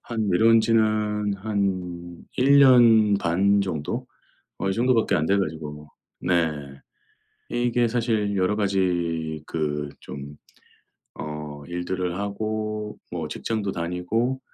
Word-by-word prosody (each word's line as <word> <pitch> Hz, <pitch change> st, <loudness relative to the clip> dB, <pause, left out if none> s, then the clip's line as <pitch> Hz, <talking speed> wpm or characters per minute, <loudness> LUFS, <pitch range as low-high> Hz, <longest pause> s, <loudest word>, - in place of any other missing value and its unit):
한 110 Hz, -3 st, -2 dB
내려온 110 Hz, +5 st, +5 dB
지는 110 Hz, -2 st, +1 dB
한 95 Hz, -4 st, -3 dB
1 140 Hz, +3 st, +5 dB
년 115 Hz, -6 st, +6 dB
반 100 Hz, +4 st, +2 dB
정도? 80 Hz, -7 st, -3 dB, 0.5 s
어 95 Hz, -, 0 dB
이 -, -, 0 dB
정도밖에 120 Hz, +1 st, +2 dB
안 75 Hz, -, +1 dB
돼 100 Hz, +4 st, +2 dB
가지고 75 Hz, -4 st, -4 dB, 0.3 s
네. 75 Hz, -6 st, -1 dB, 0.7 s
이게 120 Hz, 0 st, +1 dB
사실 110 Hz, -3 st, 0 dB
여러 95 Hz, +2 st, +1 dB
가지 85 Hz, -6 st, -1 dB
그 75 Hz, -2 st, -2 dB
좀 70 Hz, +1 st, -9 dB, 0.8 s
어 75 Hz, -1 st, -7 dB
일들을 90 Hz, 0 st, -3 dB
하고 105 Hz, +1 st, -3 dB
뭐 85 Hz, -3 st, -3 dB
직장도 105 Hz, +4 st, -3 dB
다니고, 90 Hz, +10 st, -1 dB
100 Hz, 190 characters per minute, -24 LUFS, 85-110 Hz, 0.8 s, 년